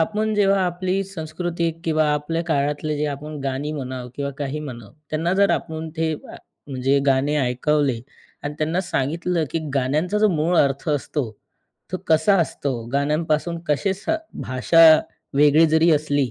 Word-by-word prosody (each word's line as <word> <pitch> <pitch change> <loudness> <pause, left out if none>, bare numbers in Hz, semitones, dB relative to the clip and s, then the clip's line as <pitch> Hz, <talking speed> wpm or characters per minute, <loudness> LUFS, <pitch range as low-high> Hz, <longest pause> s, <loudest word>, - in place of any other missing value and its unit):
आपण 215 +5 0
जेव्हा 195 -1 +3
आपली 185 +2 -1
संस्कृती 170 -1 -3
किंवा 155 -1 +2
आपल्या 155 +3 -1
काळातले 150 -1 -1
जे 150 +1 -1
आपण 150 +1 -8
गाणी 135 +3 -2
म्हणावं 130 -4 -5
किंवा 140 -1 -3
काही 145 +1 -3
म्हणाव, 120 -7 -8 0.2
त्यांना 165 +3 0
जर 200 +1 +4
आपण 160 0 -2
ते 160 -1 0
म्हणजे 135 -2 -3
गाणे 135 +2 +2
ऐकवले 130 0 +1 0.4
आणि 145 0 -4
त्यांना 160 +4 0
सांगितलं 170 0 -1
की - - -1 0.2
गाण्यांचा 150 +9 0
जो 215 0 +4
मूळ 170 0 +1
अर्थ 140 +2 +1
असतो, 145 -3 -1 0.6
तो - - 0
कसा 160 +5 +4
असतो. 135 -6 -2
गाण्यांपासून 155 +3 0
कसे 175 +6 +1
स 195 - -5 0.3
भाषा 130 +6 +2 0.5
वेगळी 150 +3 +5
जरी 160 +2 +4
असली 145 -3 +1
155 Hz, 145 wpm, -22 LUFS, 140-170 Hz, 0.6 s, वेगळी